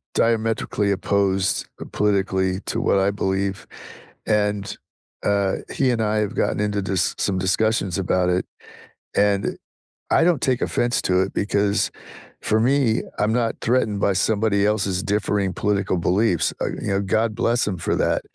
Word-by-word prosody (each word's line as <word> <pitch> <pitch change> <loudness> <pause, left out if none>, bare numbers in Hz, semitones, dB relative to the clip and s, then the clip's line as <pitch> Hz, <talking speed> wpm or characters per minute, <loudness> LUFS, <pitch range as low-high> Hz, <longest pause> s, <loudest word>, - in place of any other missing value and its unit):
diametrically 110 -2 +1
opposed, 95 -1 0
uh, - - -7
politically 95 -2 0
to - - -3
what - - +2
I 95 +1 +2
believe, 95 -1 -2 0.6
and, 105 -1 0 0.5
uh, 100 -1 +1
he 130 -2 +1
and 115 -2 0
I 110 0 0
have 105 -2 -1
gotten - - 0
into 105 -1 0
dis 95 -3 0
some 95 -2 0
discussions 95 0 0
about 90 -1 +1
it, 90 +1 0 0.7
and 100 -1 +1 0.5
I - - +4
don't 170 -5 +2
take 130 -2 +1
offense 120 0 0
to 90 0 +2
it 95 - -1
because, 100 0 0 0.5
for 110 - +1
me, 125 -1 +2 0.2
I'm 105 +1 +2
not 115 -1 0
threatened 115 -4 +1
by 100 - +2
somebody 100 +1 +1
else's 100 -3 0
differing 100 -2 0
political 100 -2 0
beliefs, 90 +1 +1
uh, - - 0
you - - -3
know, 100 0 +1
God 110 +3 0
bless 120 +2 +1
him 95 - -2
for - - -1
that. - - +1
100 Hz, 155 wpm, -22 LUFS, 95-110 Hz, 0.7 s, I